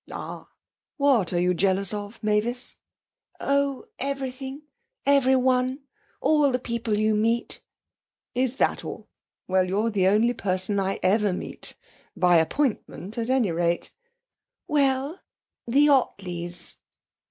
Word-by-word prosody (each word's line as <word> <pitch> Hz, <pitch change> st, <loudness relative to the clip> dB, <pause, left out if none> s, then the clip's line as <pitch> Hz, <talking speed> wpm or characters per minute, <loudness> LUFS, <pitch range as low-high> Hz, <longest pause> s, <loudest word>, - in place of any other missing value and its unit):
'Ah! -, -, -7 dB, 0.5 s
What 270 Hz, -, +3 dB
are 175 Hz, -, +1 dB
you 180 Hz, +1 st, +2 dB
jealous 190 Hz, +1 st, +1 dB
of, 205 Hz, +1 st, -5 dB
Mavis?' 215 Hz, +4 st, +1 dB, 0.6 s
'Oh, 280 Hz, -1 st, 0 dB
everything 270 Hz, +1 st, -4 dB, 0.4 s
everyone 260 Hz, -1 st, +3 dB, 0.4 s
all 295 Hz, -3 st, +3 dB
the 250 Hz, -, +1 dB
people 230 Hz, -3 st, -2 dB
you 215 Hz, 0 st, +2 dB
meet.' 230 Hz, +3 st, 0 dB, 0.7 s
'Is 255 Hz, 0 st, +1 dB
that -, -, +1 dB
all? -, -, -8 dB, 0.4 s
Well, 185 Hz, 0 st, +2 dB
you're 210 Hz, +5 st, 0 dB
the 190 Hz, -3 st, +2 dB
only 220 Hz, +5 st, +3 dB
person 190 Hz, -1 st, 0 dB
I 195 Hz, 0 st, -1 dB
ever 205 Hz, +1 st, +3 dB
meet -, -, -6 dB, 0.4 s
by 180 Hz, -1 st, +5 dB
appointment, 210 Hz, -, -1 dB
at 230 Hz, +1 st, -2 dB
any 255 Hz, -8 st, +2 dB
rate.' 170 Hz, +1 st, -1 dB, 0.7 s
'Well 280 Hz, +2 st, +1 dB, 0.5 s
the 280 Hz, +5 st, +4 dB
Ottleys!' 180 Hz, -10 st, -1 dB
230 Hz, 120 wpm, -25 LUFS, 190-265 Hz, 0.7 s, by